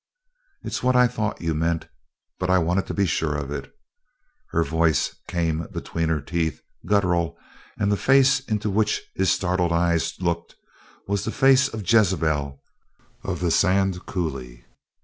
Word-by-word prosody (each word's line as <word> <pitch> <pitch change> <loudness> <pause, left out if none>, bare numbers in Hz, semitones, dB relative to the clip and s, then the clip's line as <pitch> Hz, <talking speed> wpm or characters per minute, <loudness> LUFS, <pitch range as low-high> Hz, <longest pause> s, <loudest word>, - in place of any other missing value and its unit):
"It's - - -4
what 125 0 +2
I 125 0 +6
thought 110 -3 -2
you 80 -1 0
meant, 80 +1 -1 0.5
but 90 - -2
I 95 - +5
wanted 90 +2 0
to - - -4
be 100 - +2
sure 80 -3 -1
of 70 -1 -4
it!" 75 - -6 0.8
Her 85 - +1
voice 80 +1 +1
came 85 -2 -1
between 80 -1 -3
her 80 -2 +1
teeth, 80 0 -2 0.3
guttural, 90 -4 +1 0.4
and 100 0 +1
the 100 - +2
face 135 +2 +4
into 110 -5 -2
which 105 +2 +1
his 95 -1 +1
startled 90 -1 +1
eyes 85 -1 +1
looked 85 -2 -2 0.5
was 100 0 -1
the 110 - -2
face 135 +1 +4
of 110 -5 -7
Jezebel 80 - +2 0.6
of - - -4
the 85 -2 +1
Sand 95 0 +2
Coulee. 65 -9 -4
90 Hz, 155 wpm, -24 LUFS, 80-100 Hz, 0.8 s, I